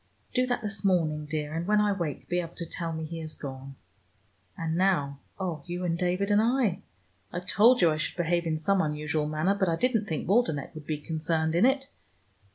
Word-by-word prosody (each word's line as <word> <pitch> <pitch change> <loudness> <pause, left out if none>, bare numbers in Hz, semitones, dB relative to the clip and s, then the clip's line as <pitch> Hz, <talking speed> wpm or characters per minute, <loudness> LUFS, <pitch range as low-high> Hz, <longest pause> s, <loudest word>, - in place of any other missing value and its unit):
Do 255 0 +2
that 245 -2 -1
this 210 -1 -3
morning, 155 -6 +1
dear, 150 0 -3
and 165 +2 -3
when 210 0 +4
I 210 0 +3
wake 170 -8 -3
be 175 - 0
able 170 -1 -5
to 170 - -4
tell 165 0 -4
me 160 0 -4
he 165 +1 -6
has 155 -1 -5
gone. 135 -1 -8 0.8
And 160 -1 -2
now, 165 -7 +1 0.2
oh, 175 -6 -3
you 175 +1 -3
and 165 -1 +1
David 180 +3 0
and 205 +1 +5
I! 230 -5 +1 0.5
I 175 - -3
told 215 +6 +4
you 165 - +6
I 155 - -1
should 155 - -2
behave 170 0 +1
in 155 -1 0
some 190 +5 +2
unusual 150 -1 -1
manner, 155 +5 +1
but 190 -3 +1
I 165 - +2
didn't 225 +1 +1
think 160 -4 -3
Waldenech 190 - +1
would 155 -2 -10
be 155 - -1
concerned 160 +1 -1
in 175 +9 +5
it. 270 0 +1
170 Hz, 215 wpm, -28 LUFS, 155-200 Hz, 0.8 s, you